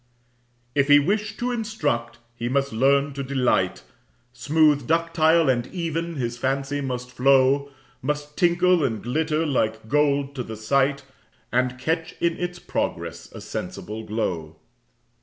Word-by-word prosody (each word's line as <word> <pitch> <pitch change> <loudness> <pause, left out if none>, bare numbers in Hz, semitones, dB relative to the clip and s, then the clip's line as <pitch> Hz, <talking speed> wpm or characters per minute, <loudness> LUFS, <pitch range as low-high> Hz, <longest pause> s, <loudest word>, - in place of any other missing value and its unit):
If 140 -1 +2
he 145 0 +8
wish 205 +8 0
to 245 +1 -1
instruct, 185 - -2 0.2
he 120 0 -3
must 140 0 0
learn 140 +4 +3
to 140 - -4
delight, 125 -9 0 0.5
Smooth, 145 +1 +2
ductile, 165 -1 +3
and 125 -2 +1
even, 170 0 -3
his 120 -3 -3
fancy 135 +2 -1
must 125 -2 -4
flow, 135 +2 +3 0.3
Must 150 +2 -3
tinkle 175 -1 +3
and 115 -5 -1
glitter 155 +5 0
like 110 -6 -1
gold 140 -1 +2
to 135 - -4
the 110 -2 -7
sight, 140 +5 +1 0.5
And 125 0 +1
catch 160 +5 -2
in 170 -1 +1
its 175 0 -3
progress - - -4
a - - -10
sensible 110 +1 -6
glow. 90 -8 -3
140 Hz, 140 wpm, -24 LUFS, 125-160 Hz, 0.5 s, he